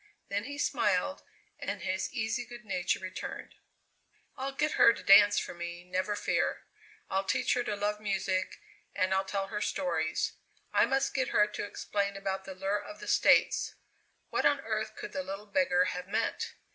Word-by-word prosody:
Then 205 +2 -1
he 285 +2 -6
smiled 235 -4 +1 0.4
and - - -4
his 190 0 -1
easy 225 -1 -1
good 240 0 -11
nature 185 -3 0
returned. 185 0 -6 0.8
"I'll 270 +1 -3
get 300 +3 0
her 230 - +6
to - - -9
dance 205 +1 +8
for - - -1
me, 175 0 -6
never 185 +3 -1
fear! - - 0 0.5
I'll 190 +1 +1
teach 250 +5 +1
her 245 - +1
to 210 - -1
love 205 +1 -1
music, 195 -2 -1 0.4
and 185 +1 +2
I'll 190 0 +1
tell 195 0 -2
her 210 -1 -3
stories. 170 -5 0 0.4
I - - +5
must 270 +2 +1
get 260 -2 +1
her 210 -6 +4
to 210 0 -5
explain 200 -1 -2
about 195 -1 -3
the 190 - -7
lure 195 +2 -1
of 315 - -10
the 420 - -9
States. - - +4 0.6
What - - +1
on - - +3
earth - - -3
could 420 0 -7
the 280 - -2
little 195 -5 -6
beggar 200 -6 +2
have 180 +1 -6
meant? 220 +3 -1
205 Hz, 180 wpm, -31 LUFS, 190-240 Hz, 0.8 s, dance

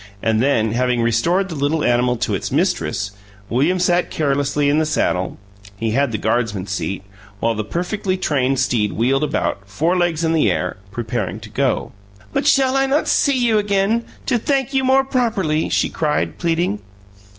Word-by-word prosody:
And 110 0 +2
then, 115 -5 +2
having 125 0 +1
restored 170 - +1
the 180 - -6
little 150 +1 0
animal 125 0 +2
to - - -1
its - - -3
mistress, 100 - 0 0.4
William 145 +10 +2
sat 180 0 +2
carelessly 145 -1 0
in 145 +2 +3
the - - +2
saddle 90 -11 0 0.4
(he 115 +1 -1
had 135 +2 +1
the 110 - -1
Guardsman's 105 -4 -1
seat) 95 0 -3 0.4
while 115 0 +1
the 110 -1 -3
perfectly 185 - -2
trained 135 -6 0
steed 120 -5 +1
wheeled 135 +5 +1
about, 125 -8 -1
forelegs 170 - 0
in 165 0 +1
the 155 -10 +3
air, 90 0 -1
preparing 110 0 -3
to - - -10
go. - - 0 0.4
"But - - 0
shall 265 -1 +4
I 270 0 +2
not 285 +3 +1
see 280 -2 +3
you 235 -3 +3
again, 205 +3 +1 0.2
to 245 -3 +1
thank 270 +2 0
you 265 0 +2
more 265 +1 +4
properly?" 215 - 0
she - - +2
cried, 150 -2 -1
pleading. 165 - 0
150 Hz, 175 wpm, -20 LUFS, 115-190 Hz, 0.4 s, shall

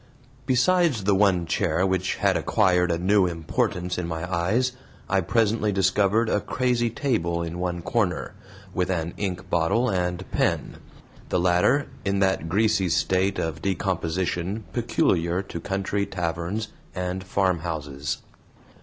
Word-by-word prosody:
Besides 135 - +3
the 100 +1 +3
one 95 -3 +3
chair 85 0 +1
which 95 -1 0
had - - +2
acquired 90 -1 +2
a 85 - +1
new 95 +2 +3
importance 90 +2 -2
in 85 - -3
my 80 +1 -4
eyes, 110 +10 +1 0.4
I 100 -1 +2
presently 110 +2 +1
discovered 100 +3 +2
a 105 - +1
crazy 125 -2 0
table 85 - -1
in 85 +1 -5
one 90 -1 -2
corner, - - -1 0.4
with 90 0 0
an 85 -2 -1
ink 95 -3 -3
bottle 85 +9 +2
and 90 0 -1
pen; - - 0 0.5
the 90 - +1
latter 90 +11 +3 0.2
in 100 0 0
that 95 -4 +1
greasy 100 0 +2
state 95 +3 +1
of 80 -1 -3
decomposition 95 +1 -1
peculiar 95 -7 +1
to 85 - -7
country 100 +2 -2
taverns 90 +4 -3 0.3
and 90 0 -3
farmhouses. 80 -7 -2
95 Hz, 135 wpm, -25 LUFS, 85-105 Hz, 0.5 s, Besides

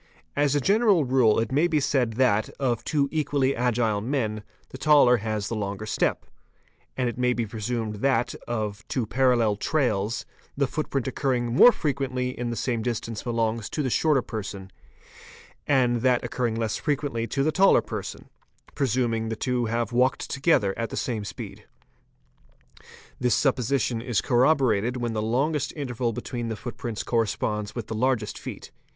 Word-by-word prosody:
As 145 0 +2
a - - +3
general 200 - +3
rule 125 -4 +3
it 115 -1 -1
may 150 +6 +3
be 160 -3 +1
said 130 -5 +1
that, 110 -3 +2
of 125 -4 0
two 145 -2 +1
equally 145 -3 +1
agile 115 -3 +1
men, 110 -3 -1 0.3
the 130 - -10
taller 140 -4 +5
has 110 -1 -3
the 115 - -4
longer 100 0 -4
step; 110 - 0 0.7
and 130 -1 +1
it 120 - -4
may 125 0 +2
be 120 -1 -1
presumed 110 0 -3
that, 135 +2 +1
of 105 -4 -3
two 125 -4 -1
parallel 120 -3 +2
trails, 115 -6 0 0.3
the 140 - +3
footprint 135 -2 -2
occurring 125 -3 -1
more 245 - +8
frequently 135 - -2
in 120 -1 -4
the 120 - -3
same 115 +1 -1
distance 115 -1 -3
belongs 115 -2 -1
to 150 - -2
the 130 - -1
shorter 150 -3 +2
person, 100 -3 -6 1.0
and 125 -4 +3
that 125 +1 +2
occurring 120 -3 -1
less 115 -2 -1
frequently 140 -6 -2
to 135 - -1
the 155 - +2
taller 190 +5 +5
person,—presuming 120 -4 -3
the 110 - -2
two 125 +1 -1
have 115 0 -1
walked 125 +2 +1
together 135 - +2
at 115 - -2
the - - -6
same 115 -5 -2
speed. 105 - -8 1.5
This 125 -3 +2
supposition 125 -3 +1
is 120 -3 0
corroborated 125 -3 +2
when 120 -2 -2
the 110 - -1
longest 140 +6 0
interval 125 -5 -2
between 120 +1 -5
the 110 - -3
footprints 115 0 -5
corresponds 105 -2 -1
with 120 -3 -4
the 110 - -6
largest 115 -2 0
feet. - - -8
120 Hz, 160 wpm, -25 LUFS, 110-135 Hz, 1.5 s, more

